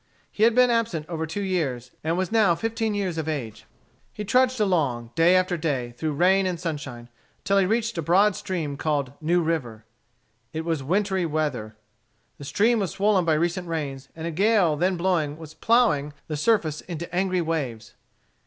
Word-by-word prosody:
He -, -, -7 dB
had 230 Hz, +1 st, +5 dB
been 250 Hz, -1 st, +5 dB
absent 225 Hz, -10 st, 0 dB
over 160 Hz, -2 st, -3 dB
two 200 Hz, +6 st, -4 dB
years, 135 Hz, -10 st, -2 dB
and 165 Hz, +2 st, 0 dB
was 185 Hz, +1 st, -1 dB
new 210 Hz, -7 st, +4 dB
fifteen 225 Hz, +2 st, -2 dB
years 185 Hz, -5 st, -2 dB
of 160 Hz, 0 st, -3 dB
age. 120 Hz, -8 st, -5 dB, 0.5 s
He 210 Hz, -, -6 dB
trudged 255 Hz, +3 st, +2 dB
along, 140 Hz, -, 0 dB
day 170 Hz, +3 st, +4 dB
after 185 Hz, -1 st, +2 dB
day, 140 Hz, -7 st, -2 dB
through 150 Hz, +6 st, -3 dB
rain 185 Hz, +5 st, +3 dB
and 175 Hz, -2 st, -3 dB
sunshine, 145 Hz, -8 st, -5 dB, 0.4 s
until 200 Hz, 0 st, +3 dB
he 190 Hz, -, +2 dB
reached 225 Hz, -3 st, 0 dB
a -, -, 0 dB
broad 190 Hz, +6 st, +3 dB
stream 160 Hz, -7 st, -4 dB
called 145 Hz, -4 st, -1 dB
New 170 Hz, +3 st, +2 dB
River. 125 Hz, -10 st, -3 dB, 0.7 s
It 160 Hz, 0 st, -4 dB
was 165 Hz, -4 st, -1 dB
wintry 190 Hz, +4 st, 0 dB
weather. 145 Hz, -9 st, -2 dB, 0.6 s
The 140 Hz, -, -8 dB
stream 225 Hz, -, +2 dB
was 195 Hz, -4 st, -1 dB
swollen 200 Hz, -2 st, +2 dB
by 160 Hz, -2 st, +3 dB
recent 175 Hz, +3 st, -1 dB
rains, 140 Hz, -5 st, -4 dB
and 160 Hz, 0 st, -6 dB
a 170 Hz, -, -2 dB
gale 190 Hz, -2 st, +3 dB
then 180 Hz, +4 st, 0 dB
blowing 170 Hz, -5 st, 0 dB
was 160 Hz, -1 st, -11 dB
ploughing 160 Hz, -, +2 dB
the 155 Hz, -, -3 dB
surface 155 Hz, -3 st, +1 dB
into 170 Hz, 0 st, -7 dB
angry 185 Hz, 0 st, +1 dB
waves. 145 Hz, -9 st, -3 dB
170 Hz, 180 wpm, -25 LUFS, 150-195 Hz, 0.7 s, had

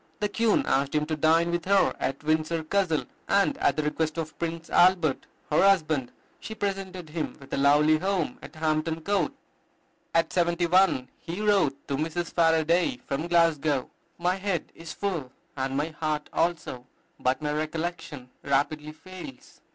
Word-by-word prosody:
The 210 Hz, -, 0 dB
Queen 225 Hz, +1 st, +2 dB
asked 135 Hz, +2 st, +1 dB
him 150 Hz, 0 st, +2 dB
to 155 Hz, 0 st, -2 dB
dine 165 Hz, +3 st, +3 dB
with 175 Hz, -1 st, -2 dB
her 195 Hz, +1 st, +3 dB
at 135 Hz, +2 st, -3 dB
Windsor 155 Hz, +1 st, 0 dB
Castle, 165 Hz, -2 st, 0 dB, 0.2 s
and, 200 Hz, 0 st, +3 dB
at 140 Hz, -, +2 dB
the 155 Hz, -, -1 dB
request 155 Hz, +1 st, -1 dB
of 155 Hz, -1 st, -4 dB
Prince 165 Hz, 0 st, -3 dB
Albert 175 Hz, -5 st, +3 dB, 0.2 s
her 150 Hz, -, +4 dB
husband, 155 Hz, -10 st, +3 dB, 0.3 s
she 220 Hz, -, -7 dB
presented 195 Hz, -4 st, -4 dB
him 155 Hz, 0 st, -4 dB
with 135 Hz, -, -12 dB
a -, -, 0 dB
lovely 150 Hz, +3 st, +4 dB
home 185 Hz, -7 st, -1 dB
at -, -, -11 dB
Hampton 155 Hz, +1 st, -1 dB
Court. 195 Hz, -2 st, 0 dB, 0.8 s
At 165 Hz, 0 st, +2 dB
seventy 175 Hz, 0 st, +2 dB
one 175 Hz, -7 st, +3 dB
he 170 Hz, +3 st, -6 dB
wrote 200 Hz, -10 st, +1 dB
to 140 Hz, -, -1 dB
Mrs. 165 Hz, +3 st, -3 dB
Faraday 165 Hz, -, +3 dB
from 145 Hz, +4 st, -2 dB
Glasgow, 160 Hz, -5 st, +2 dB, 0.3 s
"My 180 Hz, +2 st, 0 dB
head 190 Hz, -4 st, -2 dB
is 165 Hz, -1 st, -9 dB
full, 165 Hz, -11 st, -3 dB, 0.2 s
and 135 Hz, 0 st, -2 dB
my 150 Hz, +3 st, 0 dB
heart 155 Hz, -1 st, -3 dB
also; 150 Hz, -7 st, -1 dB, 0.3 s
but 130 Hz, +2 st, +1 dB
my 150 Hz, -, 0 dB
recollection 155 Hz, -4 st, -4 dB
rapidly 150 Hz, +2 st, -1 dB
fails. 185 Hz, -, -12 dB
160 Hz, 160 wpm, -27 LUFS, 150-180 Hz, 0.8 s, her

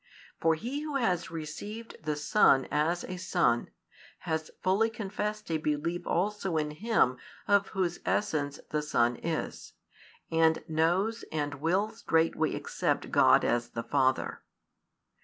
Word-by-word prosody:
For 165 Hz, -1 st, +3 dB
he 250 Hz, -, -4 dB
who 300 Hz, -2 st, -4 dB
has 185 Hz, -10 st, 0 dB
received 185 Hz, +8 st, -7 dB
the 155 Hz, -1 st, -1 dB
Son 145 Hz, -3 st, +4 dB
as 165 Hz, +4 st, +1 dB
a 185 Hz, -, -5 dB
Son, 175 Hz, -9 st, +1 dB, 0.5 s
has 160 Hz, -1 st, -2 dB
fully 200 Hz, +5 st, +3 dB
confessed 210 Hz, -2 st, -4 dB
a 160 Hz, -, +1 dB
belief 155 Hz, +3 st, -2 dB
also 190 Hz, -2 st, 0 dB
in 150 Hz, -1 st, -1 dB
Him 155 Hz, -, +2 dB, 0.3 s
of 200 Hz, -1 st, +4 dB
Whose 180 Hz, -3 st, -1 dB
essence 150 Hz, -9 st, -1 dB
the 150 Hz, -, +1 dB
Son 120 Hz, -5 st, +2 dB
is, 165 Hz, -1 st, -4 dB, 0.6 s
and 160 Hz, 0 st, +3 dB
knows 175 Hz, +8 st, +1 dB
and 145 Hz, -2 st, -3 dB
will 190 Hz, +7 st, +1 dB
straightway 165 Hz, -7 st, +1 dB
accept -, -, -2 dB
God -, -, +5 dB
as 120 Hz, 0 st, 0 dB
the 115 Hz, -, -5 dB
Father. 130 Hz, +2 st, +1 dB
165 Hz, 135 wpm, -30 LUFS, 150-205 Hz, 0.6 s, God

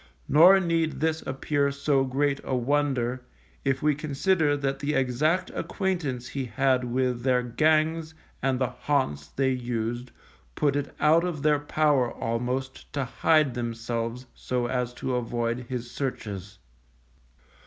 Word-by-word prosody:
Nor 175 Hz, +7 st, +7 dB
need 165 Hz, -3 st, 0 dB
this 160 Hz, 0 st, 0 dB
appear 140 Hz, +1 st, 0 dB
so 140 Hz, -1 st, +1 dB
great 140 Hz, +2 st, 0 dB
a 130 Hz, -, -1 dB
wonder, 130 Hz, -1 st, 0 dB, 0.4 s
if 135 Hz, -1 st, 0 dB
we 150 Hz, 0 st, +4 dB
consider 150 Hz, +1 st, +1 dB
that 135 Hz, -1 st, -2 dB
the 145 Hz, +1 st, -1 dB
exact 150 Hz, +8 st, +1 dB
acquaintance 160 Hz, -, -2 dB
he 135 Hz, -2 st, -3 dB
had 130 Hz, +2 st, +1 dB
with 125 Hz, 0 st, 0 dB
their 125 Hz, -1 st, +2 dB
gangs 155 Hz, +5 st, +1 dB, 0.3 s
and 130 Hz, -1 st, +1 dB
the 130 Hz, -1 st, 0 dB
haunts 125 Hz, -, -1 dB
they 135 Hz, -, 0 dB
used 120 Hz, -1 st, -3 dB, 0.5 s
put 145 Hz, -2 st, +1 dB
it 145 Hz, -, -3 dB
out 160 Hz, +3 st, +5 dB
of 170 Hz, -5 st, -3 dB
their 150 Hz, -1 st, +4 dB
power 145 Hz, -4 st, +2 dB
almost 125 Hz, +3 st, -3 dB
to 140 Hz, -2 st, -1 dB
hide 150 Hz, +2 st, +2 dB
themselves 115 Hz, 0 st, -3 dB
so 125 Hz, -1 st, -2 dB
as 125 Hz, 0 st, -1 dB
to 130 Hz, -, -3 dB
avoid 120 Hz, 0 st, -2 dB
his 120 Hz, -2 st, -4 dB
searches. 100 Hz, -8 st, -5 dB
135 Hz, 140 wpm, -26 LUFS, 125-150 Hz, 0.5 s, Nor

